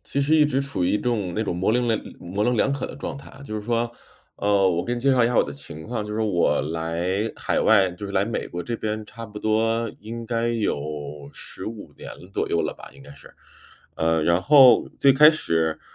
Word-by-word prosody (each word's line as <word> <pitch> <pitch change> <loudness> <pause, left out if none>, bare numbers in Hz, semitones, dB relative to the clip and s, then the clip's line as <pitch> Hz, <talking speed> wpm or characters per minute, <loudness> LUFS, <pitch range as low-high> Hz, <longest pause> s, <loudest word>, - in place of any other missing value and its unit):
其 140 - -2
实 145 +3 +2
一 150 - +5
直 135 -2 0
处 140 -10 -2
于 - - +1
一 105 - +2
种 105 -7 -1
那 110 - 0
种 100 - -2
模 95 +5 +1
棱 120 0 +1
两 110 -2 +1 0.2
模 100 +4 -2
棱 125 0 +1
两 135 - +2
可 140 -1 -3
的 - - -9
状 145 - -6
态。 140 0 -13
就 110 - -5
是 105 - -5
说 120 +1 -1 0.5
呃， 100 -2 +2
我 85 -1 0
给 120 - -2
你 120 - -5
介 135 +3 +3
绍 125 -3 +4
一 - - +4
下 120 - -1
我 - - +6
的 70 - -6
情 70 +2 -9
况， 110 0 -4
就 105 - -5
是 110 - -2
我 100 -6 +2
来 85 +7 -2
海 - - -1
外 100 -4 +4
就 90 +3 -8
是 100 - -7
来 95 0 +2
美 115 +1 -3
国 85 - -6
这 115 +3 -4
边 110 0 -3
差 115 +1 -10
不 105 0 -10
多 115 +1 +1
应 115 +2 -7
该 115 0 -1
有 75 -9 -3
15 110 +3 -9
年 - - -10 0.2
左 - - -1
右 - - +1
了 - - -2
吧， - - -13
应 - - -15
该 - - -13
是， 70 - -16 0.6
呃， 80 0 +1
然 85 +3 +2
后 135 +1 +6
最 140 - +6
开 150 +3 +8
始 80 - -1
110 Hz, 255 characters per minute, -23 LUFS, 90-120 Hz, 0.6 s, 开